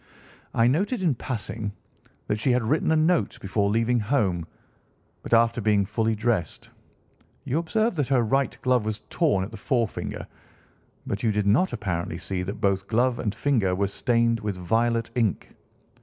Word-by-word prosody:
"I 115 - +4
noted, 190 - +1
in 165 -5 +3
passing, 110 -4 -4 0.5
that 105 - -1
she 130 - 0
had 125 -1 +1
written 150 +7 +1
a - - +4
note 160 +2 +2
before 100 +1 0
leaving 115 +3 +2
home 100 - 0 0.7
but - - -9
after 115 0 +4
being 105 -2 +2
fully 110 +2 0
dressed. 110 -7 -2 0.7
You 145 +6 0
observed 215 +4 0
that 145 -4 +1
her 130 -3 +3
right 135 +4 0
glove 125 -3 +3
was 110 0 -3
torn 145 - +2
at 100 - -7
the 110 - -8
forefinger, 120 -5 -2 0.8
but 100 - -3
you 115 - +2
did 105 -1 0
not 130 - +3
apparently 90 -7 -3
see 90 +1 -3
that 100 +3 -5
both 100 -2 0
glove 120 +2 +1
and 105 -3 -2
finger 110 -10 +1
were 100 +2 +1
stained 115 +2 +1
with 105 -3 -3
violet 115 +5 0
ink. 115 - -1
115 Hz, 170 wpm, -25 LUFS, 100-130 Hz, 0.8 s, I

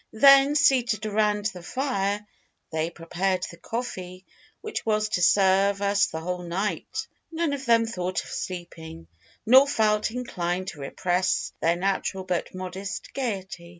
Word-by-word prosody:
Then, 275 +4 +7
seated 245 -7 +3
around 210 -1 +1
the 180 - -9
fire, 205 -1 -2 0.5
they 160 +1 -1
prepared 180 +2 -2
the 170 - -13
coffee 185 -4 -6 0.4
which 435 - -4
was 215 -1 +1
to 180 - -1
serve 195 +2 +4
us 200 0 +2
the 160 - -6
whole 180 +2 -3
night. 185 +1 -3 0.3
None 325 -2 -1
of 275 -1 -5
them 230 -1 +5
thought 185 -4 -3
of - - -11
sleeping, 165 - -7 0.4
nor 260 +5 +7
felt 215 -6 +2
inclined 185 -7 -3
to 150 - -10
repress 180 +6 -1
their 165 +1 +3
natural 190 +1 -1
but 185 0 -3
modest 185 +1 -6
gaiety. 190 -9 -4
195 Hz, 145 wpm, -26 LUFS, 180-220 Hz, 0.5 s, Then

